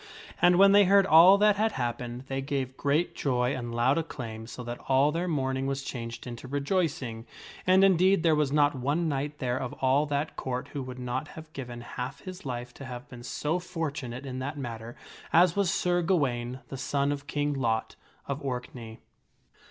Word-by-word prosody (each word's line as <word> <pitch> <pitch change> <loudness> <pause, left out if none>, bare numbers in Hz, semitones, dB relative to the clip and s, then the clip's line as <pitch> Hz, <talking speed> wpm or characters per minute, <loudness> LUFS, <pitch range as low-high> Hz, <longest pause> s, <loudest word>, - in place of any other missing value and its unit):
And 175 0 +6
when 195 +2 +7
they 205 0 +7
heard 195 +1 +5
all 180 +4 +8
that 210 0 +4
had 220 +1 +1
happened, 120 0 -3
they 135 0 -4
gave 135 -2 -3
great 145 +6 0
joy 125 -1 0
and 120 -2 -5
loud 130 +6 +3
acclaim 115 -8 -6
so 125 +1 -8
that 120 0 -6
all 135 +2 +4
their 170 +3 -2
mourn 135 -5 0
ing 135 +1 -2
was 135 0 -2
changed 115 -3 -6
into 120 +1 -7
rejoicing. 140 -5 -2 0.4
And, 185 +1 +6
indeed, 190 -1 +4
there 165 -2 +4
was 150 -3 +1
not 145 0 +4
one 145 +6 0
knight 145 0 -2
there 125 -2 -1
of 125 - -4
all 135 +3 +2
that 145 +1 -2
Court 125 0 -4
who 145 - -5
would 130 -1 -7
not 125 +4 -3
have 160 -1 -12
given 120 -3 -7
half 125 +2 -6
his 185 -4 -8
life 120 -1 -5
to 140 - -10
have 125 +1 -8
been 125 -1 -10
so 150 +7 -2
fortunate 150 -8 -5
in 130 -1 -5
that 145 +3 -4
matter 115 -3 -6 0.4
as 170 +1 +5
was 200 -3 +2
Sir 175 -1 +1
Gawaine, 130 -8 0
the 135 - -6
son 140 +2 0
of 145 0 -5
King 145 0 -1
Lot 115 -5 -1 0.3
of 140 +1 -3
Orkney. 125 -4 -6
135 Hz, 195 wpm, -28 LUFS, 125-160 Hz, 0.4 s, all